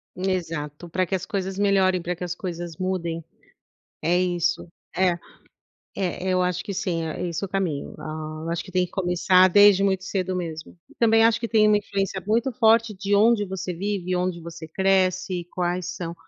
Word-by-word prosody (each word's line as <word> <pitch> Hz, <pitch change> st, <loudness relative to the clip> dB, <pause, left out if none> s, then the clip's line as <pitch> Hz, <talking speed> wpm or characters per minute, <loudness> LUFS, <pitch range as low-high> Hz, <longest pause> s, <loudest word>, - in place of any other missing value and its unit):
Exato, 170 Hz, -4 st, -3 dB
pra 185 Hz, +2 st, 0 dB
que 190 Hz, -, -1 dB
as 190 Hz, 0 st, -4 dB
coisas 195 Hz, -1 st, -3 dB
melhorem, 190 Hz, -2 st, +3 dB
pra 180 Hz, +1 st, -3 dB
que 175 Hz, -, -7 dB
as 175 Hz, 0 st, -3 dB
coisas 175 Hz, -2 st, -6 dB
mudem. 175 Hz, -3 st, -2 dB, 0.8 s
É 175 Hz, +2 st, +2 dB
isso, 175 Hz, -1 st, 0 dB, 0.3 s
é 185 Hz, -1 st, +3 dB, 0.8 s
é, 185 Hz, -1 st, -2 dB
eu 185 Hz, 0 st, +2 dB
acho 180 Hz, 0 st, -1 dB
que 200 Hz, -, -4 dB
sim, 170 Hz, -3 st, -1 dB
é 160 Hz, +2 st, -3 dB
esse 170 Hz, +2 st, -4 dB
é -, -, -2 dB
o -, -, -14 dB
caminho. 180 Hz, -7 st, -2 dB
Ah, 155 Hz, 0 st, -6 dB
eu 165 Hz, -, -3 dB
acho 170 Hz, -, -2 dB
que 185 Hz, -, -12 dB
tem 180 Hz, 0 st, +2 dB
que 180 Hz, -, -9 dB
começar 185 Hz, 0 st, +4 dB
desde 205 Hz, +1 st, +6 dB
muito 190 Hz, -1 st, +1 dB
cedo 185 Hz, -1 st, -2 dB
mesmo, 160 Hz, -3 st, -6 dB, 0.2 s
também 225 Hz, -1 st, +5 dB
acho 225 Hz, 0 st, +4 dB
que 230 Hz, -, -2 dB
tem 215 Hz, -2 st, +4 dB
uma 210 Hz, -, +5 dB
influência 195 Hz, -2 st, -2 dB
muito 230 Hz, +5 st, +1 dB
forte 230 Hz, -2 st, +4 dB
de 200 Hz, +1 st, -1 dB
onde 215 Hz, +1 st, +4 dB
você 185 Hz, -1 st, -4 dB
vive, 185 Hz, 0 st, -2 dB
onde 180 Hz, -1 st, -1 dB
você 165 Hz, -1 st, -9 dB
cresce 185 Hz, 0 st, +1 dB
e -, -, -9 dB
quais 175 Hz, 0 st, -2 dB
são 170 Hz, -1 st, -5 dB
185 Hz, 195 wpm, -24 LUFS, 175-195 Hz, 0.8 s, desde